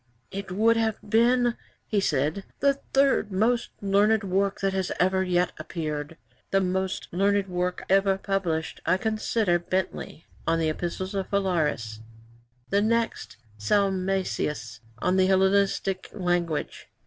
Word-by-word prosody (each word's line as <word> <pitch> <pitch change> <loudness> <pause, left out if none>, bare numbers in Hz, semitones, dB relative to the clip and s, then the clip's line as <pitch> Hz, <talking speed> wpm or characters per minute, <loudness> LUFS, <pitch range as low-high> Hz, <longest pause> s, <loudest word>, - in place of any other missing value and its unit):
'"It 195 -1 -6
would 225 +4 +3
have 220 -2 +1
been," 240 +2 +3 0.3
he 210 - 0
said, 155 +2 0 0.2
"the 280 0 +4 0.2
third 270 -6 +3
most 225 +5 +1
learned 205 +2 +3
work 195 +1 0
that 195 -1 0
has 190 -1 -1
ever 190 +1 +3
yet 180 -1 +1
appeared. 155 -1 -4 0.3
The 195 - +3
most 190 0 -1
learned 200 +2 +2
work 180 0 -2
ever 195 0 +3
published 180 -5 -2
I 185 - +2
consider 215 -3 0
Bentley 185 -2 -3 0.2
On 165 0 +3
the 160 -1 +1
Epistles 175 +4 -3
of 195 -1 -3
Phalaris; 155 - 0 0.7
the 200 +1 +3
next 230 +1 -1 0.2
Salmasius 185 - 0 0.2
On 180 +10 +1
the 185 0 +4
Hellenistic 190 0 +2
Language." 175 -5 -2
190 Hz, 130 wpm, -26 LUFS, 175-200 Hz, 0.7 s, the